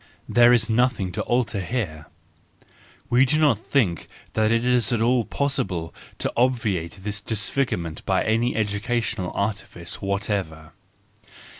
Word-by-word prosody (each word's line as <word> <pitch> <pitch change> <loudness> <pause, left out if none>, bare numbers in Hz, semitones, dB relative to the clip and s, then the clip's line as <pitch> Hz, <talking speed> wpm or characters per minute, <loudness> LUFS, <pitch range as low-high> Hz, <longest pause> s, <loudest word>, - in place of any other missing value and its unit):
There 120 0 +6
is 120 -2 +3
nothing 115 -5 +1
to - - -3
alter 120 -4 0
here. 90 -8 -4 1.0
We 120 - +4
need 135 +3 +4
not 145 -9 +3
think 110 -10 0 0.2
that 110 0 +2
it 115 +1 +2
is 125 -3 +3
at 120 - +1
all 120 0 +2
possible 95 -12 -2 0.2
to - - -2
obviate 105 -8 0
this 105 0 -2
disfigurement 100 -6 -1
by - - +1
any 115 +3 +1
educational 110 -2 -1
artifice 100 -4 -3
whatever. 100 -5 -2
110 Hz, 130 wpm, -24 LUFS, 95-120 Hz, 1.0 s, There